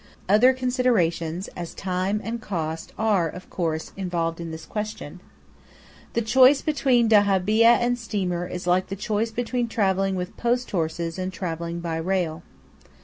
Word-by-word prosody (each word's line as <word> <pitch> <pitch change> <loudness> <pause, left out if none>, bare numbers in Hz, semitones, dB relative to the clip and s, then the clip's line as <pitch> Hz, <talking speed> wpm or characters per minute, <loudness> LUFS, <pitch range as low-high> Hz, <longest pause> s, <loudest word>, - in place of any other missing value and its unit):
Other 215 +7 +6
considerations, 210 -10 0
as 175 -1 -8
time 190 +2 -1
and 230 +1 -4
cost, 160 -5 -4
are, 205 -7 +2
of 180 +4 -11
course, 160 -3 -2
involved 170 -3 -2
in 170 - -5
this 160 0 -8
question. 215 -6 -5 0.9
The 235 - 0
choice 260 +5 +5
between 265 -6 +2
dahabeeyah 205 +1 +4
and 245 0 0
steamer 185 -6 -2
is 180 0 -6
like 180 +1 +2
the 195 - -4
choice 210 +2 -1
between 245 +1 -2
travelling 195 -3 +1
with 180 0 -4
post 245 +1 0
horses 165 0 -2
and 185 0 -2
travelling 170 -1 -4
by 165 -1 -3
rail. 170 -1 -1
190 Hz, 145 wpm, -24 LUFS, 170-225 Hz, 0.9 s, Other